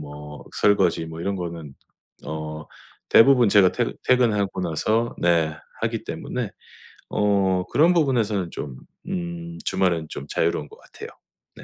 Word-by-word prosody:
뭐 75 Hz, 0 st, -9 dB, 0.2 s
설거지 95 Hz, -5 st, +3 dB
뭐 80 Hz, 0 st, -8 dB
이런 100 Hz, +3 st, -1 dB
거는 85 Hz, -6 st, -6 dB, 0.5 s
어 80 Hz, 0 st, -5 dB, 0.4 s
대부분 125 Hz, -2 st, +6 dB
제가 100 Hz, -2 st, +5 dB
퇴근 -, -, -1 dB
퇴근하고 105 Hz, -7 st, +2 dB
나서 110 Hz, +8 st, 0 dB
네 85 Hz, -3 st, +2 dB, 0.3 s
하기 -, -, -2 dB
때문에 -, -, -4 dB, 0.6 s
어 100 Hz, -3 st, +2 dB
그런 165 Hz, +5 st, +5 dB
부분에서는 115 Hz, -, +1 dB
좀 65 Hz, -3 st, -6 dB, 0.3 s
음 170 Hz, -2 st, -5 dB
주말은 85 Hz, -4 st, +1 dB
좀 70 Hz, -, -7 dB
자유로운 80 Hz, -3 st, 0 dB
것 -, -, -16 dB
같아요. -, -, -11 dB, 0.5 s
네. -, -, -12 dB
95 Hz, 270 characters per minute, -23 LUFS, 80-115 Hz, 0.6 s, 대부분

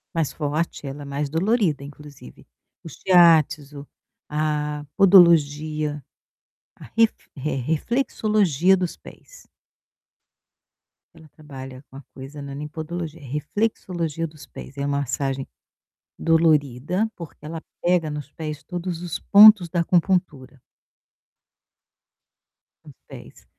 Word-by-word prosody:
Mais 155 Hz, -5 st, -1 dB
forte, 150 Hz, 0 st, -3 dB
ela 140 Hz, +2 st, -7 dB
é -, -, -10 dB
mais 140 Hz, +1 st, -3 dB
dolorida, 170 Hz, -, 0 dB
inclusive. 145 Hz, -, -13 dB, 0.4 s
O 165 Hz, -, -9 dB
Shiatsu, 155 Hz, -5 st, +3 dB, 0.4 s
a 150 Hz, -1 st, -2 dB
podologia, 155 Hz, -5 st, +4 dB, 0.7 s
a -, -, -14 dB
ref 225 Hz, -1 st, +4 dB, 0.2 s
eh, 145 Hz, +2 st, -3 dB
reflexologia 190 Hz, -, +1 dB
dos 180 Hz, -2 st, -3 dB
pés. -, -, -16 dB, 1.7 s
Ela 160 Hz, -1 st, -16 dB
trabalha 135 Hz, -3 st, -10 dB
com 135 Hz, -, -12 dB
a -, -, -10 dB
coisa, 140 Hz, +2 st, -10 dB
né, 140 Hz, -, -8 dB
não -, -, -8 dB
é -, -, -7 dB
nem 150 Hz, +1 st, -6 dB
podologia, 165 Hz, +1 st, -6 dB
reflexologia 165 Hz, -, -3 dB
dos 150 Hz, -3 st, -11 dB
pés, 140 Hz, -, -11 dB
é 140 Hz, -, -3 dB
a -, -, -1 dB
massagem 135 Hz, -1 st, -2 dB, 0.7 s
dolorida, 160 Hz, -, +1 dB
porque 165 Hz, -3 st, -11 dB
ela 160 Hz, +1 st, -6 dB, 0.2 s
pega 175 Hz, -3 st, +1 dB
nos 150 Hz, -1 st, -7 dB
pés 150 Hz, -3 st, -7 dB
todos 175 Hz, 0 st, -5 dB
os 175 Hz, -2 st, -5 dB
pontos 210 Hz, -3 st, +8 dB
da 170 Hz, +1 st, -1 dB
acupuntura. 170 Hz, -7 st, 0 dB, 2.2 s
Nos -, -, -14 dB
pés. -, -, -13 dB
155 Hz, 115 wpm, -23 LUFS, 145-175 Hz, 2.2 s, pontos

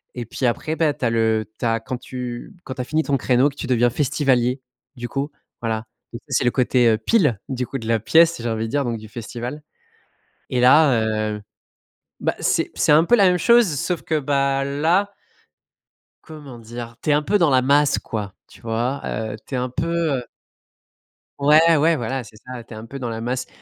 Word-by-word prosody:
et 120 Hz, -1 st, -5 dB
puis 125 Hz, +3 st, -4 dB
après, 155 Hz, +6 st, -1 dB
bah, 160 Hz, -3 st, +1 dB
tu -, -, -11 dB
as -, -, +3 dB
le 110 Hz, -1 st, +1 dB
tu -, -, -4 dB
as 115 Hz, 0 st, +1 dB
quand 125 Hz, +3 st, -5 dB
tu 125 Hz, +2 st, -7 dB
quand 130 Hz, -, -7 dB
tu 130 Hz, -, -4 dB
as -, -, -2 dB
fini 155 Hz, +5 st, 0 dB
ton 140 Hz, -3 st, 0 dB
créneau, 130 Hz, +4 st, +2 dB
que 140 Hz, -, -15 dB
tu -, -, -6 dB
deviens 120 Hz, -2 st, +2 dB
festivalier, 130 Hz, -1 st, +1 dB, 0.3 s
du 120 Hz, -1 st, -6 dB
coup, 140 Hz, +4 st, -3 dB, 0.3 s
voilà. 110 Hz, -1 st, -3 dB, 0.2 s
Donc 115 Hz, -, -8 dB
ça, 135 Hz, -, -6 dB
c'est -, -, 0 dB
le 120 Hz, -, +2 dB
côté, 125 Hz, -1 st, +2 dB
heu, 110 Hz, -1 st, +4 dB
pile, 145 Hz, -, +2 dB
du 125 Hz, -1 st, -2 dB
coup, 135 Hz, +2 st, -5 dB
de 115 Hz, -, -8 dB
la 115 Hz, -1 st, +2 dB
pièce, 165 Hz, +7 st, +4 dB
j'ai 120 Hz, -, -4 dB
envie 110 Hz, 0 st, -2 dB
de 110 Hz, -, -5 dB
dire, 145 Hz, +1 st, 0 dB
donc 115 Hz, -1 st, -2 dB
du 110 Hz, -, -11 dB
festival. 120 Hz, +5 st, -7 dB, 0.9 s
Et 125 Hz, -, 0 dB
là, 130 Hz, -2 st, +5 dB, 0.3 s
heu, 105 Hz, -, -7 dB, 0.8 s
bah, -, -, -1 dB
c'est -, -, 0 dB
c'est -, -, +1 dB
un 155 Hz, +2 st, +6 dB
peu 240 Hz, -, +3 dB
la 200 Hz, -5 st, +5 dB
même 180 Hz, -1 st, +3 dB
chose 235 Hz, +3 st, +5 dB
sauf 175 Hz, +3 st, -2 dB
que 155 Hz, -1 st, 0 dB
bah, 135 Hz, -1 st, 0 dB
là 165 Hz, +9 st, +1 dB, 1.1 s
comment 145 Hz, -6 st, -10 dB
dire? 115 Hz, 0 st, -8 dB
Tu -, -, -2 dB
es -, -, +5 dB
un 150 Hz, -, +3 dB
peu 205 Hz, +7 st, +1 dB
dans 170 Hz, -5 st, +3 dB
la 130 Hz, -1 st, +4 dB
masse, 145 Hz, +2 st, +3 dB
quoi, 105 Hz, -3 st, -5 dB
tu -, -, -18 dB
vois, 120 Hz, +4 st, -2 dB
heu, 110 Hz, -1 st, -3 dB
tu 135 Hz, -, -5 dB
es -, -, 0 dB
un 125 Hz, +1 st, -1 dB
peu, 165 Hz, +2 st, -1 dB
heu -, -, -8 dB, 1.2 s
Ouais, 155 Hz, +3 st, +5 dB
ouais, 160 Hz, +3 st, +3 dB
voilà, 130 Hz, 0 st, -3 dB
c'est 110 Hz, -, -16 dB
ça. 125 Hz, -2 st, -8 dB
Tu 115 Hz, -, -13 dB
es -, -, -8 dB
un 110 Hz, -, -8 dB
peu 135 Hz, +4 st, -8 dB
dans 120 Hz, -2 st, -3 dB
la 115 Hz, 0 st, -4 dB
masse. 125 Hz, +2 st, -3 dB
130 Hz, 225 wpm, -21 LUFS, 115-150 Hz, 1.2 s, un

